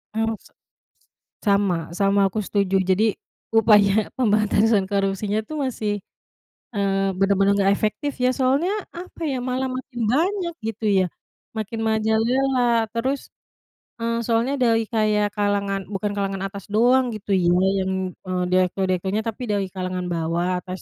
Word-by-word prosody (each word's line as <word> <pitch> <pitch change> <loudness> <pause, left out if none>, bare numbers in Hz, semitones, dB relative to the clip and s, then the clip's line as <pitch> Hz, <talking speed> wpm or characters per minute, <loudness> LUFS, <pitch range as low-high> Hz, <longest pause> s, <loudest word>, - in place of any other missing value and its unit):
Oh 225 0 0
sek - - -21 0.9
sama 200 -3 +3 0.2
sama, 200 0 +3
aku 215 +3 -3
setuju. 200 -2 0
Jadi, 190 +4 +3 0.5
upaya 210 -3 +5 0.3
pemberantasan 215 -1 +3
korupsinya 200 +1 0
itu 265 - -10
masih, 220 -5 -2 0.8
mmm, 195 -1 0
benar-benar 195 0 +3
nggak 195 +1 +4
efektif 280 +7 -1
ya, 250 - +4
soalnya, 275 +9 +2 0.3
apa 360 -1 -11
ya, 260 - -1
malah 260 +1 -1
makin 250 -2 -7
banyak, 350 +3 0
gitu 225 0 -4
ya, 185 - +3 0.5
makin 220 +1 -4
merajalela. 230 +2 +2
Terus, 265 +4 -2 0.7
eee, 230 0 -1
soalnya 235 +3 +1
dari 225 -2 +3
kayak 210 -1 +1
kalangan 200 -1 0
bukan 205 +1 -2
kalangan 195 -1 -2
atas 195 -1 -9
doang, 250 +3 +4
gitu 205 -1 -6
ya, 180 -2 +3 0.3
yang, 190 0 -1 0.4
e - - -6 0.2
direktur-direkturnya, 185 +2 +1
tapi 225 +2 -4
dari 200 -2 0
kalangan 185 -1 -3
bawah, 170 +2 -1
tas 185 0 -6
210 Hz, 135 wpm, -23 LUFS, 195-230 Hz, 0.9 s, upaya